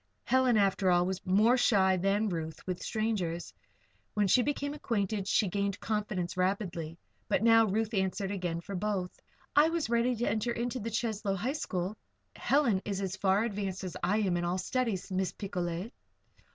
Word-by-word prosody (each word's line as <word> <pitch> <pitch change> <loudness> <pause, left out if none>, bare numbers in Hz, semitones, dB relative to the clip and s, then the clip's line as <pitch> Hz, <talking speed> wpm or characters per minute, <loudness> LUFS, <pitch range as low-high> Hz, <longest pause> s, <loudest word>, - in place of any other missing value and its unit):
Helen, 255 -2 +3
after 195 -2 +2
all, 175 0 +4
was 190 +1 -3
more 215 +7 +4
shy 190 -6 +4
than 195 +4 +1
Ruth 160 -3 -5
with 180 -1 -3
strangers. 205 -7 -2 0.6
When 205 -1 +2
she 245 - +5
became 285 +2 -2
acquainted 205 -7 -2
she 205 - +3
gained 200 +1 -1
confidence 205 -5 -2
rapidly. 180 -4 -2 0.3
But 195 - +1
now 225 -1 +6
Ruth 220 +3 -1
answered 190 0 -1
again 175 -4 -2
for 200 - -8
both: 190 -1 -1 0.4
"I 300 +2 +6
was 330 -7 -2
ready 235 +1 +2
to 235 +1 -1
enter 220 +3 0
the 235 -1 -3
Cheslow 220 -3 -1
High 235 +8 -1
School; 190 - -3 0.4
Helen 255 -9 +2
is 200 -2 -3
as 190 -1 -2
far 195 +2 +2
advanced 195 -4 -3
as 185 - -5
I 185 +4 +2
am 185 -4 +1
in 175 - -1
all 175 +1 0
studies, 220 -2 -2
Miss 185 0 -1
Picolet." 180 +1 -4
200 Hz, 170 wpm, -30 LUFS, 185-225 Hz, 0.6 s, now